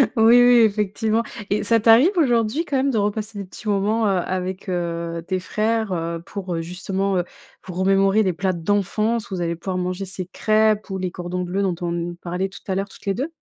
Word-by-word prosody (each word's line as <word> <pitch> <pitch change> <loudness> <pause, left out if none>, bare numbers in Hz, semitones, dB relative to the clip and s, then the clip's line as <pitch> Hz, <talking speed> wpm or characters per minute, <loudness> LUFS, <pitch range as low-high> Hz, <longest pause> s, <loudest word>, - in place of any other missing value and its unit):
Oui, 230 +1 +6
oui, 245 0 +6
effectivement 215 +1 +1 0.3
et 205 - 0
ça 230 +2 +3
t'arrive 230 - +6
aujourd'hui 240 -1 +2
quand 285 -5 -1
même 270 +1 +2
de 245 - 0
repasser 210 +1 -2
des 200 - -5
petits 200 +4 -11
moments, 210 +2 +1
heu, 190 -3 +2
avec, 185 +1 -4
heu, 170 -1 -3
tes 185 -1 -1
frères, 220 +2 -1
heu, 165 -1 -3
pour, 190 -4 -5
heu, 165 - -2
justement, 190 +3 -2
heu, 175 - +1 0.4
pour 180 -2 -8
remémorer 195 +2 +3
les 185 -3 +1
plats 190 +2 -1
d'enfance 205 +5 0
où 195 - -4
vous 180 - -3
allez 170 0 -1
pouvoir 185 +2 -4
manger 185 +2 -2
ces 190 -1 -5
crêpes 215 +2 +1
ou 190 - -3
les 185 -1 -3
cordons 180 0 -4
bleu 180 +3 -2
dont 190 -3 0
on 175 -1 -1
n 175 0 -3
parlait 180 +2 -3
tout 190 - -12
à 190 - -1
l'heure 195 +1 -2
toutes - - -16
les 195 - +1
2? 270 +10 -3
195 Hz, 225 wpm, -22 LUFS, 180-220 Hz, 0.4 s, Oui